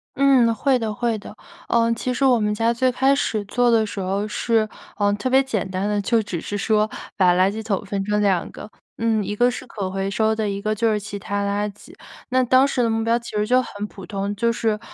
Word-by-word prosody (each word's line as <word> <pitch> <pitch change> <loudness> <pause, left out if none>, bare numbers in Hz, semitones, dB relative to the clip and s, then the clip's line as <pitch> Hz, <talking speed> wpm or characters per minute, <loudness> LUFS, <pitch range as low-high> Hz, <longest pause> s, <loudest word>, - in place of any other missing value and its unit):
嗯， 260 -4 +4
会 260 +4 +2
的 220 -3 -3
会 230 +1 -1
的。 205 0 -11 0.3
呃， 230 0 +2
其 250 +2 -2
实 260 - -2
我 255 -3 +5
们 210 -1 0
家 225 +2 +1
最 255 +2 +1
开 265 +2 +3
始 220 -6 -1
做 245 +4 +2
的 225 -1 +4
时 205 - -6
候 195 +2 -1
是， 220 0 +1 0.3
呃， 205 -1 +2
特 205 +5 -3
别 265 +1 +5
简 225 -8 -2
单 185 +2 -2
的， 210 0 0
就 225 +3 +2
只 200 -5 -4
是 205 - -5
说 215 +1 +2 0.3
把 180 -2 +5
垃 185 +2 +3
圾 220 +2 -6
桶 210 -2 -2
分 195 0 -2
成 210 0 0
2 195 -4 +1
个。 - - -10 0.3
嗯， 225 -2 +1
一 210 - -3
个 245 +3 +3
是 250 - -6
可 200 -6 -5
回 195 +1 -2
收 220 +1 +1
的， 215 -1 -1
一 200 0 -3
个 215 +1 -1
就 225 +1 +1
是 210 - 0
其 205 0 -7
他 200 0 -3
垃 200 +1 -1
圾。 205 - -16 0.4
那 255 0 +2
当 260 +2 +4
时 260 -3 0
的 230 - +1
目 225 0 0
标 230 +1 +2
其 235 - -8
实 210 0 0
就 250 +2 +4
很 210 -4 -5
普 195 -3 -11
通， 200 0 -3
就 230 +3 +1
是， 220 -2 -1
215 Hz, 265 characters per minute, -22 LUFS, 205-235 Hz, 0.4 s, 我